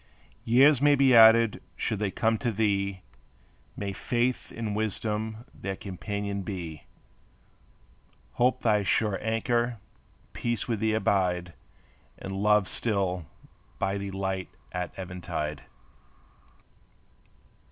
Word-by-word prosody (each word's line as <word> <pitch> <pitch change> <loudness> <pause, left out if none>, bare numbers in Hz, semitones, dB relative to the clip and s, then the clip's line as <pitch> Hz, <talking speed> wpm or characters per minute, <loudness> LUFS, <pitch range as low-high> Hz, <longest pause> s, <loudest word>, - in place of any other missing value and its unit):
Years 135 +4 +5
may 145 0 +6
be 135 -2 +4
added; 115 -1 +7
should 110 - -2
they 105 -2 0
come 110 +3 0
to 120 - 0
thee 100 -3 0 0.7
May 100 -1 -3
Faith 120 +4 -1
and 110 -3 -4
Wisdom 110 +1 -2
their 95 0 -5
companion 100 +1 -4
be; 85 -6 -6 1.5
Hope 125 +1 +1
thy 105 -3 +3
sure 100 +1 +1
anchor; 120 +2 0 0.6
Peace 120 -1 -2
with 115 -3 -1
thee 110 0 +1
abide, 90 -5 0 0.6
And 95 - -7
Love 105 0 +3
still 95 -6 -1 0.5
be 100 0 -2
thy 95 - -7
light 95 -1 -2 0.2
at 90 0 -3
eventide. 85 -5 -5
105 Hz, 110 wpm, -28 LUFS, 95-115 Hz, 1.5 s, added